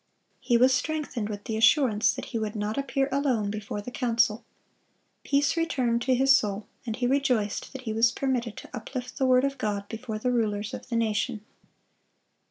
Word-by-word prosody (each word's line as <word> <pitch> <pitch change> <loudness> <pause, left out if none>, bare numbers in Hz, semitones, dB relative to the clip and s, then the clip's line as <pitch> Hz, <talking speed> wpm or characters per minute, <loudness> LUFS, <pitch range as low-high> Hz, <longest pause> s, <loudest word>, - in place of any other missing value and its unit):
He 245 -2 +2
was 255 +2 +5
strengthened 255 -5 -2
with 205 -1 -6
the 220 - -3
assurance 225 -1 +4
that - - -6
he 230 - 0
would 215 -1 -3
not 210 +1 -2
appear 275 -1 0
alone 255 -7 +1
before 210 -1 -5
the 250 - -8
council. 230 -3 +1 0.8
Peace 285 +1 +2
returned 255 -8 0
to 255 +1 +2
his 270 +2 +5
soul, 210 -5 -1 0.2
and 225 - -2
he 245 - -1
rejoiced 250 -6 0
that 265 -1 -8
he 220 -3 -3
was 230 +1 +4
permitted 245 -5 -2
to - - -9
uplift 250 +3 -6
the 265 - +3
word 255 0 +5
of 275 -1 -1
God 205 -3 -2
before 225 -1 -5
the 250 +3 -1
rulers 215 -1 -1
of - - -8
the 235 - -2
nation. 225 0 0
235 Hz, 185 wpm, -27 LUFS, 215-265 Hz, 0.8 s, was